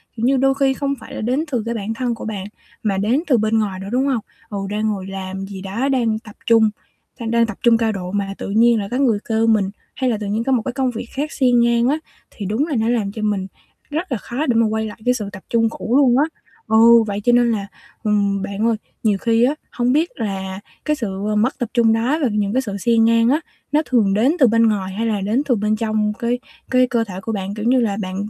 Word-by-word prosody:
kiểu 230 +1 -2
như, 270 +1 +3
đôi 270 +1 +3
khi 270 -1 +3
không 280 0 -1
phải - - -10
là - - -4
đến 255 +7 0
từ 235 -4 0
cái 235 - -2
bản 220 +1 -3
thân 240 0 -2
của - - -8
bạn, 205 -4 -4 0.4
mà 200 -3 0
đến 235 - +1
từ 255 -6 +4
bên 220 +1 +2
ngoài 195 -3 -2
nữa, 195 - -7
đúng 260 +3 +1
hông? 255 -5 0 0.3
Ừ, 205 - -4
đang 215 +1 -1
ngồi 195 -3 -3
làm 190 0 -5
gì 195 -1 -8
đó, 220 +8 -2
đang 230 -5 +1
tập 215 -2 -14
trung 225 -2 +5 0.5
đang 230 -1 -3
đang 235 0 +4
tập 225 -3 -6
trung 235 -1 +5
cao 225 -1 +1
độ 185 -3 -5
mà 195 -1 -2
tự - - -5
nhiên 230 +2 +4
lại 200 - -3
có 250 - 0
người 235 -7 +2
kêu 225 +1 +2
mình, 210 -4 +3 0.3
hay 260 -1 0
là 225 - 0
tự 210 - -4
nhiên 215 +3 -1
có 270 - -1
một 250 - +3
cái 260 - -2
công 265 -1 0
việc 230 - -5
khác 295 +3 -2
xen 250 -3 +3
ngang 235 0 +3
á, 295 +4 +2 0.3
thì 205 - -7
đúng 225 - 0
là 295 - -2
nó 225 - +1
làm 220 -5 0
cho 215 - -7
mình 205 -3 -1 0.4
rất 320 +3 -3
là 250 - 0
khó 255 +8 -3
để 245 - +2
mà 230 0 +4
quay 220 0 -1
lại 215 - -8
cái 250 - +4
sự 210 -5 -4
tập 190 -2 -10
trung 230 -1 +2
cũ 230 +2 -2
luôn 255 -3 +5
á. 285 - +4 0.4
Ừ, 230 +1 +6
vậy 205 0 -3
cho 240 - +4
nên 240 -1 +4
là, 200 -3 -2 0.4
ừm, 200 -2 +1
bạn 200 +2 -2
ơi, 230 - +2 0.3
nhiều 210 -3 +2
khi 230 +3 +2
á, 275 +4 +3 0.2
hông 245 +1 +1
biết 320 +4 +2
là 190 -4 -4 0.3
cái 300 - +1
sự 210 -4 -3
mất 240 +6 +1
tập 245 -4 -2
trung 230 -2 +4
đó 245 +8 +1
và 270 - +3
những 205 -1 0
cái 260 - +2
sự 200 -5 -5
xen 225 +2 +3
ngang 230 +1 +4
á, 300 +4 +2 0.3
nó 300 - +3
thường 220 -6 +2
đến 245 - +3
từ 260 - +6
bên 230 +1 +3
ngoài 190 -3 -2
hay 225 +3 -2
là 210 -3 0
đến 215 +7 +1
từ 250 - +4
bên 215 0 0
trong 215 -1 0
cái 240 +1 0 0.3
cái 255 0 +4
cơ 235 -2 +1
thể 195 -5 -8
của 225 - -4
bạn? 195 -2 -3
Kiểu 215 +1 -5
như 255 +2 +4
là, 205 -4 0
bạn, 185 -1 -5
225 Hz, 270 wpm, -20 LUFS, 205-245 Hz, 0.5 s, Ừ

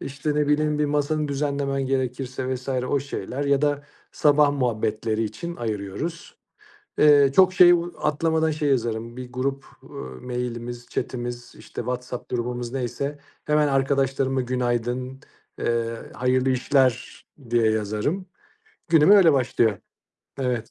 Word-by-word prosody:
işte, 140 +2 -3
ne 150 -1 +1
bileyim, 150 0 +2
bir 150 - +2
masanı 150 +1 0
düzenlemen 140 -1 -1
gerekirse 130 0 -2
vs. 130 +2 -8
o 130 +1 0
şeyler 140 0 -4
ya 140 0 +2
da 145 0 0 0.3
sabah 145 -1 +4
muhabbetleri 110 -3 -1
için 170 +12 -6
ayırıyoruz. 110 - -5 0.6
Eee, 145 -2 +6
çok 185 -1 +6
şey 180 -1 +7
ııı, 175 0 +2
atlamadan 160 +1 +1
şey 150 -1 -1
yazarım: 115 -2 -1
Bir 125 -1 -8
grup, 135 +2 -2 0.2
ııı, 65 0 -9
mailimiz, 120 -1 -5
chatimiz 120 -1 -5
işte, - - -8
WhatsApp 125 +1 -5
grubumuz 120 0 -3
neyse, 140 +3 -3 0.3
hemen 150 -1 +2
arkadaşlarıma 135 -1 +1
günaydın, 125 +1 -2 0.4
eee, 115 0 -1 0.2
hayırlı 130 +1 +1
işler, 130 -1 +1 0.3
diye 115 -2 +3
yazarım, 110 - -1 0.6
günüm 160 +2 +5
öyle 190 -7 +7
başlıyor. 115 -5 +1 0.6
Evet. 125 -4 -2
130 Hz, 130 wpm, -24 LUFS, 120-145 Hz, 0.6 s, şey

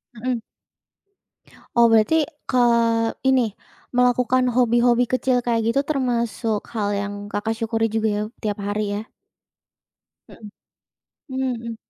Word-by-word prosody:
Mhm. 245 +1 -2 1.4
Oh, 235 -1 +5
berarti 225 +9 +4 0.2
ke 255 - 0 0.7
ini, 255 -4 +3 0.4
melakukan 250 +1 +2
hobi-hobi 240 0 +3
kecil 255 0 +1
kayak 230 -1 +1
gitu, 275 - +2
termasuk 235 -6 -1
hal 210 -3 -1
yang 205 0 -3
Kakak 220 +2 -3
syukuri 225 0 0
juga 220 0 0
ya, 210 0 0 0.2
tiap 210 -2 -3
hari 205 0 -2
ya. - - -25 1.2
Mhm. 215 - -12 0.8
Mmm, 260 -1 -1
mhm. 230 -1 -6
235 Hz, 115 wpm, -22 LUFS, 220-250 Hz, 1.4 s, Oh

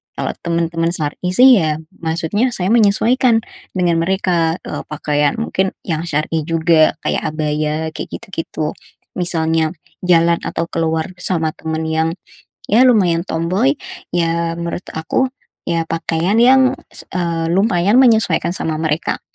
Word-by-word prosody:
Kalau - - -2
teman-teman 170 0 0
syar'i, 170 +2 -3
sih, 255 -2 +7
ya 155 -2 -1 0.2
maksudnya 170 +9 -1
saya 185 -4 -2
menyesuaikan 230 +2 +3 0.3
dengan 175 -2 +2
mereka, 170 -2 +1
eee, - - -5
pakaian 150 -1 0
mungkin 190 -4 -1
yang 165 -2 -2
syar'i 155 0 -1
juga, 165 -1 +3
kayak - - -1
abaya, 155 +1 -1
kayak - - -5
gitu-gitu. 165 -7 -4 0.5
Misalnya, 160 -2 +1 0.3
jalan 170 -1 +4
atau 165 0 -2
keluar 160 +1 -1
sama 165 -4 0
teman 160 0 -3
yang, 160 +1 0 0.6
ya, 225 +5 +5
lumayan 185 -9 +3
tomboi, 165 -4 0 0.4
ya, 170 -1 0
menurut 170 +1 -4
aku, 160 +11 0 0.4
ya, 165 -1 0
pakaian 165 +4 -1
yang, 260 +1 +5 0.4
eee, 170 -2 -1
lumayan 195 +2 +2
menyesuaikan 225 -7 +3
sama 160 -1 -2
mereka, 155 0 -1
170 Hz, 125 wpm, -17 LUFS, 160-190 Hz, 0.6 s, sih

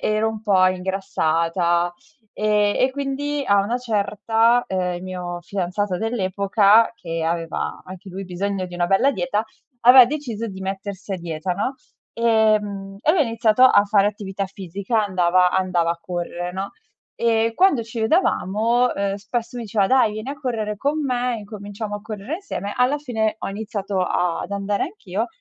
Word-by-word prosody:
ero 215 +1 +1
un 220 -1 -5
po' 195 -4 +3
ingrassata, 175 -2 0 0.4
ehm, 210 -1 +2
e 260 - +3
quindi 280 +1 -2
a 200 - +3
una 235 +5 -1
certa, 225 +1 +2
ehm, 185 -1 -1
il 175 - -7
mio 180 -1 -5
fidanzato 185 +1 -2
dell'epoca, 205 0 +3
che 165 -5 -4
aveva 165 0 -3
anche 185 +1 -10
lui 195 +2 -6
bisogno 190 +1 -3
di 180 - -10
una 175 0 0
bella 195 +9 +3
dieta, 250 -5 -1 0.4
aveva 250 +1 +9
deciso 240 -5 -4
di 190 -3 -8
mettersi 195 +1 -6
a - - -1
dieta, 170 0 -3
no. 205 +9 -2 0.4
E 220 -2 +3
mhmm, 195 -1 -7
e 300 - +3
lui 360 - +2
ha - - +7
iniziato 230 -1 +2
a 255 -5 +7
fare 200 -1 +3
attività 200 -1 -5
fisica, 195 +4 -2
andava 180 -1 +3
andava 180 -3 +1
a 170 - -3
correre 175 0 -4
no, 190 +2 -4 0.4
e 230 -1 +1
quando 360 -11 +3
ci 230 +1 -6
vedevamo, 230 - +2
ehm, 200 0 -1
spesso 230 +4 -4
mi 240 - -4
diceva: 205 -2 +1
"Dai, 260 -3 +4
vieni 215 +4 -6
a - - -4
correre 230 -7 -3
con 285 +8 -1
me, 250 -3 -1
incominciamo 205 0 -7
a 205 - -6
correre 215 +5 -5
insieme", 205 - -5
alla 250 +4 +2
fine 225 -6 -1
ho - - -4
iniziato 200 -1 -3
ad 180 0 -1
andare 200 0 -1
anch'io, 225 - -3
205 Hz, 170 wpm, -22 LUFS, 185-230 Hz, 0.4 s, aveva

